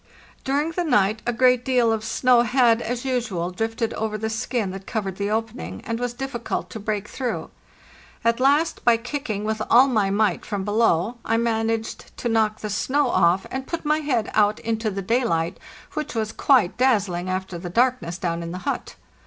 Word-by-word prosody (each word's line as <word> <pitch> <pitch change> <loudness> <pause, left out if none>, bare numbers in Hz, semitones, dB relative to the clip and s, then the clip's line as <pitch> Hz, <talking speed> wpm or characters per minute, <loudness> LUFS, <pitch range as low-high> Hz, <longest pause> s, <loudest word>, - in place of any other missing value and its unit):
During 290 +4 0
the 355 +2 -1
night 215 - +2
a - - +3
great 250 +1 +3
deal 245 -3 +3
of 220 -1 -2
snow 240 +2 +3
had, 240 -1 +3
as 245 +2 -3
usual, 220 -9 -1
drifted 225 +3 -2
over 215 -1 -2
the 220 +1 -3
skin 220 -2 -2
that 195 0 -9
covered 195 -5 -3
the 200 0 -1
opening, 225 +2 -3
and 230 -1 -2
was 245 -1 -3
difficult 255 -2 -4
to 220 - -6
break 210 -1 -3
through. 250 +1 -4 0.7
At 230 +1 +3
last, 285 +5 +2
by 235 -1 +5
kicking 240 -4 -4
with 215 0 -2
all 250 +3 +7
my 215 -7 +1
might 210 +2 +1
from 200 -3 -3
below, 215 0 +2
I 225 - +1
managed 225 -1 -2
to 240 - -2
knock 220 -1 +1
the 215 - -4
snow 265 +6 +1
off, 185 +1 +3
and 265 0 -4
put 335 -2 -4
my 305 +1 +2
head 255 -8 -1
out 210 0 +3
into 225 -1 -1
the 195 -1 -4
daylight, 185 -7 0 0.3
which 300 -4 -4
was 220 -1 -1
quite 245 -10 +3
dazzling 200 -8 +1
after 185 -1 -3
the 175 0 -6
darkness 230 -5 +1
down 170 -2 -2
in 170 0 -5
the 180 - -5
hut. - - -3
225 Hz, 190 wpm, -23 LUFS, 205-250 Hz, 0.7 s, all